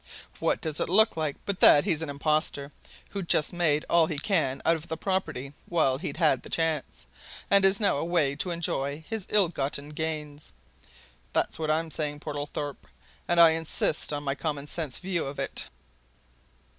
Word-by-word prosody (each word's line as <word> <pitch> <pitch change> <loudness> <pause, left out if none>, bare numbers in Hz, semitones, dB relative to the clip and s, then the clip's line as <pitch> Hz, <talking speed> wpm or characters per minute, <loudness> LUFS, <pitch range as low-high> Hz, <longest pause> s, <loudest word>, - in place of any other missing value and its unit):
What - - 0
does 155 -1 -2
it - - -1
look 220 +5 +4
like 155 -3 -2
but 200 -2 -2
that 145 - +7
he's 165 -6 0
an 160 - -3
impostor, 145 0 0 0.4
who's 200 -3 -4
just 150 - +2
made 160 -4 +2
all 170 -2 +4
he 155 - -2
can 140 -6 +1
out 165 - +4
of 160 0 -8
the 160 - -4
property 155 -8 -2
while 135 -6 +1
he'd 180 - -4
the 150 -7 +1
chance, 160 -3 -2 0.5
and 200 -1 +6
is 195 +1 +5
now 205 -8 +2
away 160 -3 +1
to 180 - -2
enjoy 160 -3 -2
his 220 -4 -5
ill 205 -4 +4
gotten 140 -2 -3
gains? 150 - -5 0.8
That's - - 0
what 155 -1 -2
I'm 160 +1 0
saying, 150 -1 -2
Portlethorpe 145 -1 -5 0.4
and 175 0 +2
I 165 -1 +9
insist 160 -1 -1
on 145 0 -3
my 135 -1 0
common 145 0 -3
sense 150 -4 -3
view 180 -2 -2
of 140 - -7
it!" - - -2
155 Hz, 175 wpm, -27 LUFS, 145-170 Hz, 0.8 s, I